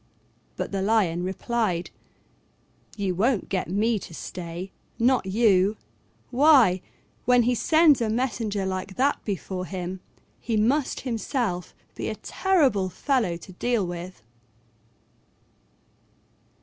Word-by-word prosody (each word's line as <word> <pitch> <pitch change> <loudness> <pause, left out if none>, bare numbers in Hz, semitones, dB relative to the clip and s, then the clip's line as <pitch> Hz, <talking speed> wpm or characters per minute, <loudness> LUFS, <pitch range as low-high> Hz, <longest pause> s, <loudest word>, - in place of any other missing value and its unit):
But - - -4
the 195 -1 -1
Lion 195 -5 +2
replied, 190 -1 -1 1.1
"You 195 -3 -1
won't 220 +4 +1
get 185 -3 -2
me 215 +4 +1
to 165 - -10
stay, 175 +2 -6 0.3
not 245 -3 +2
you: 200 -1 +3 0.5
why, 250 - +5 0.4
when 245 -1 +5
he 245 +2 +2
sends 310 +2 +4
a 225 - +1
messenger 220 -4 -1
like 190 0 -4
that 275 +3 +1
before 185 -2 -4
him, 185 0 -5 0.4
he 225 -2 -1
must 255 +7 +1
himself 230 - -2 0.2
be - - -4
a - - -3
terrible 275 - +1
fellow 225 - 0
to 180 - -12
deal 235 +1 0
with." 175 - -7
205 Hz, 115 wpm, -25 LUFS, 185-245 Hz, 1.1 s, why